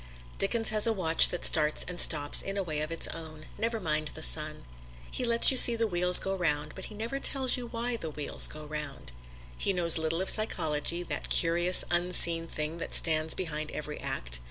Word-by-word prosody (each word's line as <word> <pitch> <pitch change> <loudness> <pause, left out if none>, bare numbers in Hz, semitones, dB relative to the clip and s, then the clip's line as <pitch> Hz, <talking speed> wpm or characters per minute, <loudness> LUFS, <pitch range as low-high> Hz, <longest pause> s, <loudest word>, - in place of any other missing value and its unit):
Dickens 225 +3 -1
has 215 +1 -1
a 225 - -2
watch 165 -5 +4
that 175 - -5
starts 150 -1 +1
and 180 -1 -4
stops 145 -2 +3
in 195 +1 -8
a 195 - -4
way 155 -4 -7
of 155 +1 -7
its 165 - -2
own 155 -1 -11
never 230 0 -5
mind 155 -4 -4
the - - -7
sun. 60 0 0 0.5
He - - -4
lets 235 +1 +4
you 260 - -1
see 240 -1 +10
the 230 0 -3
wheels 180 -2 +7
go 195 - 0
round, 150 -4 -5
but 190 - -11
he 215 - -14
never 230 +6 -7
tells 265 -2 +1
you 250 -2 -9
why 235 +1 -6
the 165 -7 -9
wheels 150 -1 -1
go 155 0 -12
round. 150 - -10 0.4
He 195 - -3
knows 170 -3 +3
little 160 +1 -4
of - - +4
psychology 170 -5 -1
that - - -7
curious, 175 +2 +4
unseen 175 -1 +1
thing 155 +1 -8
that - - -5
stands 160 -1 -1
behind 155 -4 -7
every 150 0 -8
act. - - -3
170 Hz, 205 wpm, -25 LUFS, 155-205 Hz, 0.5 s, see